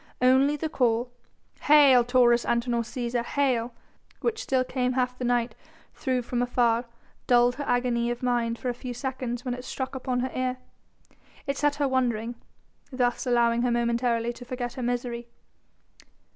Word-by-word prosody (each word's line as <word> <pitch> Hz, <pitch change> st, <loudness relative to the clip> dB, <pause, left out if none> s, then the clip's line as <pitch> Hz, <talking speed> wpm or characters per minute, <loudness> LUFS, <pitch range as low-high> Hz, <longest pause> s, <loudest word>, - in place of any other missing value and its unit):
Only 265 Hz, +3 st, +4 dB
the 310 Hz, +2 st, -3 dB
call, 245 Hz, -4 st, 0 dB, 0.5 s
"Hail 280 Hz, -4 st, +6 dB
Taurus 240 Hz, -1 st, +4 dB
Antinor 235 Hz, 0 st, 0 dB
Cæsar! 240 Hz, 0 st, -3 dB
Hail!" 250 Hz, -3 st, 0 dB, 0.5 s
which 460 Hz, -2 st, -1 dB
still 260 Hz, -1 st, +1 dB
came 250 Hz, 0 st, -1 dB
half 250 Hz, -1 st, 0 dB
the 255 Hz, -, -6 dB
night 240 Hz, -1 st, +1 dB, 0.4 s
through 255 Hz, -3 st, -1 dB
from 240 Hz, +1 st, -2 dB
afar 240 Hz, -1 st, +1 dB, 0.4 s
dulled 245 Hz, -1 st, +4 dB
her 290 Hz, -, -3 dB
agony 245 Hz, -1 st, +1 dB
of 240 Hz, +1 st, -4 dB
mind 235 Hz, -2 st, 0 dB
for 255 Hz, -, -3 dB
a -, -, -1 dB
few 245 Hz, 0 st, -7 dB
seconds 250 Hz, -2 st, -4 dB
when 250 Hz, -, -1 dB
it 250 Hz, 0 st, -7 dB
struck 260 Hz, 0 st, -5 dB
upon 255 Hz, -1 st, -2 dB
her 260 Hz, -, -2 dB
ear. 255 Hz, 0 st, -1 dB, 0.9 s
It 275 Hz, -, -1 dB
set 290 Hz, +1 st, +1 dB
her 290 Hz, -1 st, 0 dB
wondering, 240 Hz, -3 st, 0 dB, 0.6 s
thus 250 Hz, 0 st, -1 dB
allowing 235 Hz, -1 st, +3 dB
her 245 Hz, -, +1 dB
momentarily 235 Hz, 0 st, 0 dB
to 245 Hz, -, -11 dB
forget 245 Hz, -1 st, -5 dB
her 260 Hz, -, -6 dB
misery. 240 Hz, -1 st, -3 dB
245 Hz, 160 wpm, -26 LUFS, 240-255 Hz, 0.9 s, Hail